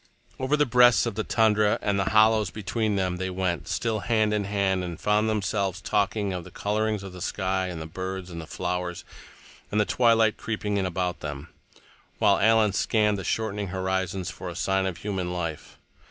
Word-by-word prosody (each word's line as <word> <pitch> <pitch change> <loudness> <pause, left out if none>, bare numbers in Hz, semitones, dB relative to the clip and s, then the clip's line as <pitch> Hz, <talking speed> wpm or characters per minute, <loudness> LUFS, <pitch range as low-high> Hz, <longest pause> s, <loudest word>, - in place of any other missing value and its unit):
Over 135 +3 +1
the 150 - +3
breasts 125 -2 +5
of - - -2
the 110 +2 -2
tundra 105 -2 +3
and 100 -1 0
the 95 - +1
hollows 110 -2 +4
between 105 +2 -2
they 95 -1 -1
went, 90 -5 -2
still 115 -2 -1
hand 110 -1 +1
in 105 -1 0
hand, 95 -2 0
and 85 -2 -6
found 105 +1 +2
themselves 100 -3 -1
talking 100 +1 0
of 90 -1 -4
the - - -11
colorings 105 0 -1
in 95 - -7
the 90 0 -10
sky, 95 0 -1
and 90 -3 -5
the 80 - -6
birds, 95 +2 -5
and 85 -2 -7
flowers, 90 -1 -3 0.7
and 105 - +1
the 105 - +3
twilight 115 -2 +3
creeping 105 -2 -2
in 95 -2 0
about 90 -1 -2
them, 75 0 -6 0.7
while - - +4
Alan 110 -1 +4
scanned 105 0 +1
the - - -5
shortening 105 +1 -2
horizons 95 0 -2
for 90 - -7
a 85 - -7
sign 95 +1 0
of 90 -3 -4
human 95 -2 -3
life. 85 -3 -5
100 Hz, 185 wpm, -26 LUFS, 90-110 Hz, 0.7 s, breasts